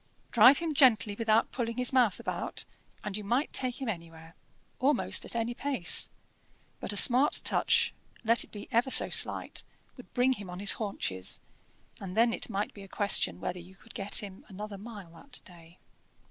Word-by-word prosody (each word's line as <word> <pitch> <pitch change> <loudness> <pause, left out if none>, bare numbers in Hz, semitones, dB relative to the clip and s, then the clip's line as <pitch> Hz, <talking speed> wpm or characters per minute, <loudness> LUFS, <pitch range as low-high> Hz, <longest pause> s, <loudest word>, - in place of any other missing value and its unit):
Drive 265 +2 +7
him 330 -2 -3
gently 240 -7 +4
without 220 +1 +1
pulling 230 -2 -4
his 250 +1 0
mouth 245 -7 +3
about, - - -4 0.4
and 205 -2 -5
you 210 - -4
might 245 +8 -1
take 255 -1 -1
him 265 - -5
anywhere, 165 -4 -7 0.5
almost 280 +3 +1
at - - -3
any 230 +1 -1
pace; 265 -8 0 0.7
but - - -3
a 205 - -2
smart 255 +6 +6
touch, - - +2 0.3
let 230 +1 +3
it - - -18
be 205 - -9
ever 235 +3 +2
so - - +3
slight, - - +1 0.3
would 250 - -14
bring 250 +1 +3
him 200 -6 -9
on 180 - -7
his 200 +1 +5
haunches, 95 - -4 0.6
and 190 0 -8
then 230 0 +4
it - - -3
might 205 0 -3
be 200 - -12
a 195 - -11
question 200 - +1
whether 180 - -4
you 180 +2 -14
could 230 +3 -18
get 200 +1 0
him 195 -1 -10
another 200 +1 -8
mile 205 -5 -10
that 250 +11 -12
day. 170 -2 -16
215 Hz, 185 wpm, -29 LUFS, 190-245 Hz, 0.7 s, Drive